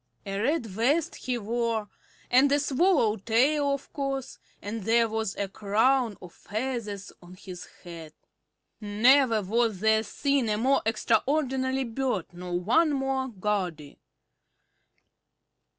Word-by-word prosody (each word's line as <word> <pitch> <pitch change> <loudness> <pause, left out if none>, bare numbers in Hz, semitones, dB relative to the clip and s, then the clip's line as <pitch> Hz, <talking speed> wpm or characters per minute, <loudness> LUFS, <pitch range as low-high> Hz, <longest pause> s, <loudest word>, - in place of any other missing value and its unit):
A 195 0 -3
red 280 +2 0
vest 240 - 0
he 250 -1 -3
wore, 230 -1 -2 0.4
and 265 +3 +5
a 285 - +3
swallow 285 - +2
tail, 275 +8 +2
of 280 - -13
course, 275 -2 -4 0.2
and 215 +2 -5
there 230 +3 +3
was 220 -2 -3
a 200 - -2
crown 220 +4 +1
of 180 - -11
feathers 215 -3 -5
on 180 +1 -13
his 185 -2 -10 0.2
head. 165 -3 -9 0.7
Never 225 +2 +3
was 220 0 0
there 220 +1 +3
seen 275 +1 -1
a 210 - 0
more 265 +5 +2
extraordinary 260 +3 0
bird 235 -7 -3
nor 175 0 -4
one 250 - +2
more 270 -1 -1
gaudy. 185 - -3
230 Hz, 125 wpm, -27 LUFS, 205-265 Hz, 0.7 s, and